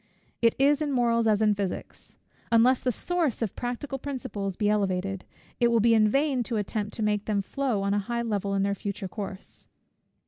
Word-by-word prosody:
It 230 -1 +4
is 285 +2 +3
in 295 -2 0
morals 235 -3 +2
as 215 0 +3
in 210 -1 +4
physics; 200 -2 -5 0.3
unless 235 +3 +5
the 250 - 0
source 325 -4 -1
of 215 - -3
practical 260 +3 -4
principles 250 -9 -4
be 210 - 0
elevated, 195 -2 0 0.3
it 240 - +4
will 235 -1 +3
be 230 +1 +4
in 215 -1 +5
vain 275 +1 +1
to 230 - -2
attempt 210 0 -3
to 220 - -2
make 210 -1 0
them 205 -2 0
flow 250 -3 -1
on 200 0 +1
a 205 - +2
high 235 +4 -2
level 200 -3 -1
in 195 - +1
their 200 0 +1
future 200 0 -4
course. 195 -1 -7
220 Hz, 200 wpm, -27 LUFS, 200-245 Hz, 0.3 s, unless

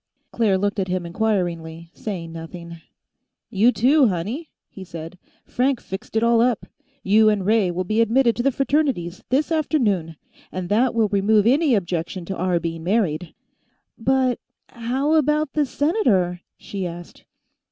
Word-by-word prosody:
Claire 215 -5 +2
looked 200 +2 -1
at 190 - -1
him 180 -1 -2
inquiringly, 170 -4 -2
saying 175 -6 -6
nothing. 170 0 -9 0.7
"You, 215 +5 +4
too, 265 +3 +4
honey," 215 - -3 0.2
he 195 - -11
said. 165 0 -9 0.3
"Frank 255 0 0
fixed 190 +3 -8
it 220 - +2
all 235 0 +4
up. 240 -2 +1 0.4
You 215 +2 +5
and 205 -3 0
Ray 215 -2 +3
will 175 +1 -2
be 215 +5 +1
admitted 235 +1 +3
to - - 0
the 275 +3 +2
Fraternities, 270 - -1
this 285 +5 +1
afternoon. 215 - 0 0.4
And 185 -1 -5
that 235 +4 +2
will 220 -2 +2
remove 205 +1 +3
any 275 +2 +4
objection 175 -1 -3
to 190 - -4
our 180 -1 0
being 165 -1 -5
married." 175 -4 -1 0.6
"But... 255 +1 +1 0.3
how 255 +6 -1
about 300 -1 +2
the 300 -2 +1
Senator?" 210 - +1 0.2
she 195 -3 -5
asked. 175 0 -10
210 Hz, 150 wpm, -22 LUFS, 175-250 Hz, 0.7 s, You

